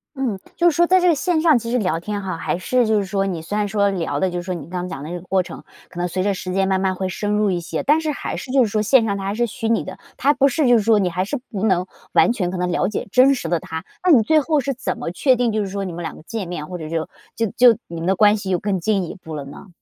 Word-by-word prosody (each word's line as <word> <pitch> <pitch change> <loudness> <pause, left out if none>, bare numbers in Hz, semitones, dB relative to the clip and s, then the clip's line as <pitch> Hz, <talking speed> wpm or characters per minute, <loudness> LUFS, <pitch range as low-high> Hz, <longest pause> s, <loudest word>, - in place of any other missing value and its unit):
嗯， 250 -8 -2 0.2
就 345 0 +4
是 315 - -3
说 345 +2 +4
在 370 +1 +5
这 360 - +2
个 340 - +5
线 320 +2 0
上 315 -6 +5
其 230 - -6
实 245 - +1
聊 180 -8 0
天 205 +3 -4
哈， 185 -3 -4
还 165 - -2
是 245 +6 +1
就 220 0 +3
是 200 - -2
说 195 0 -1
你 175 -4 -3
虽 170 +6 -5
然 210 -1 0
说 200 0 +1
聊 165 -7 -2
的 185 +2 +1
就 175 - -3
是 - - -6
说 185 0 -3
你 170 - -6
刚 160 - -14
刚 180 - -4
讲 140 -5 -6
的 155 - -7
那 175 - -4
个 - - -14
过 185 +1 0
程， - - -10 0.3
可 175 - -9
能 175 - 0
随 185 +1 -2
着 200 0 +1
时 185 -1 -5
间 195 0 +1
慢 190 -1 +1
慢 190 -1 0
会 190 0 -2
深 205 +3 -3
入 210 -1 +2
一 180 - -1
些， 170 +2 -4
但 300 +3 +3
是 310 -1 -1
还 - - -4
是 255 - -6
就 265 -1 +4
是 - - +1
说 215 - +1
线 230 +2 +4
上 200 -2 -1
他 195 - -5
还 200 +1 -2
是 240 +2 +1
虚 225 0 -4
拟 230 - +2
的， - - -9 0.2
他 285 - +3
不 275 -1 +3
是 280 +1 +1
就 245 - +6
是 215 - 0
说 220 0 +4
你 190 -3 +1
还 180 +2 -1
是 250 +9 -3
不 200 -3 -4
能 185 -4 +2 0.3
完 - - +5
全 185 -7 -2
可 185 - -4
能 180 0 -1
了 180 - +1
解 210 - -4
真 260 +3 +5
实 245 - -5
的 170 - +1
他。 160 +1 -6 0.2
那 365 - +4
你 245 -8 +6
最 310 +8 +4
后 305 0 +1
是 275 0 -1
怎 250 -1 -4
么 235 -8 -4
确 260 +8 +3
定 245 -1 +1
就 215 0 0
是 200 - -2
说 200 +1 -3
你 180 - -5
们 175 - -6
两 165 - -5
个 - - -14
见 215 0 -5
面， 170 -3 -5
或 180 - -6
者 155 -1 -6
就 160 -1 -2 0.3
就 225 - 0
就 245 -2 +5
你 170 - -7
们 170 - -3
的 190 - +3
关 210 +1 +5
系 200 -2 -6
有 185 - +2
更 200 -3 -1
进 195 +2 0
一 170 - -6
步 160 -4 -9
了 145 -2 -5
呢？ 140 +7 -11
200 Hz, 365 characters per minute, -21 LUFS, 180-245 Hz, 0.3 s, 就